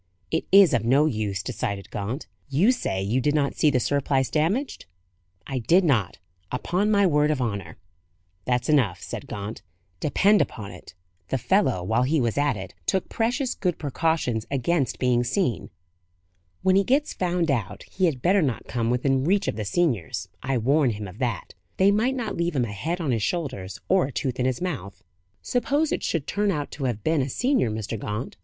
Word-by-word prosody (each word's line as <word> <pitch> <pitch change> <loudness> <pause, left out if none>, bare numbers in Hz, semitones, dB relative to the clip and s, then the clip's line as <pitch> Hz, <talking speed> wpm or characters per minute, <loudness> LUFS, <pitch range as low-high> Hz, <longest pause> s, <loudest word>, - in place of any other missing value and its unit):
"It 160 - 0
is 195 -5 +7
of 120 -3 +2
no 135 +6 +4
use," 105 -8 -1
decided 100 -5 -4
Gaunt. 110 +8 -4 0.2
"You 165 - +4
say 95 - -2
you 115 +7 0
did 145 +4 +1
not 140 -2 +1
see 155 - +3
the 130 -3 +2
surplice 135 0 0
damaged?" 185 - -1 0.6
"I 135 -1 -3
did 175 +11 +4
not; 120 - +1 0.3
upon 180 +11 0
my 200 -2 +4
word 150 -3 +3
of 150 -3 0
honour." 100 -9 -3 0.7
"That's 125 -1 0
enough," 130 - +2
said - - -6
Gaunt. 105 +2 -6 0.4
"Depend 200 +7 +3
upon 105 -4 -4
it, 90 -1 -13 0.3
the 135 - 0
fellow, 130 - +1
while 110 +6 +1
he 145 +5 +2
was 120 -4 0
at 145 -5 +1
it, 95 -2 -8
took 190 - 0
precious 245 +3 0
good 180 -4 -1
precautions 145 -6 -1
against 140 0 0
being 125 -1 +2
seen. 125 - -1 0.9
When 190 0 +4
he 195 - +5
gets 280 +7 +1
found 175 -3 0
out, 105 -6 -2
he 190 - -1
had 140 -8 -1
better 190 +2 +4
not 130 -7 -1
come 115 -2 -1
within 130 +2 +1
reach 195 +6 +2
of - - -1
the 110 - -3
seniors; 100 - -1
I 130 0 0
warn 135 +4 +3
him 105 -2 -4
of 95 +4 -12
that: 120 -8 -2 0.2
they 195 +1 +5
might 230 +6 +1
not 235 -5 -3
leave 170 -1 -1
him 125 -3 +2
a 105 - -6
head 165 - -3
on 155 -6 -1
his 115 -3 0
shoulders, 130 - -3
or 185 -6 +3
a - - -7
tooth 130 -1 -3
in 125 - +2
his 130 +2 -2
mouth." 125 - -5 0.4
"Suppose 285 +5 0
it - - -1
should 160 -5 -1
turn 205 0 0
out 150 -6 -2
to 140 - -4
have 115 -5 -2
been 160 -2 +2
a 130 - -2
senior, 250 - +1
Mr. 110 0 -4
Gaunt?" 105 +5 -4
135 Hz, 195 wpm, -25 LUFS, 115-175 Hz, 0.9 s, is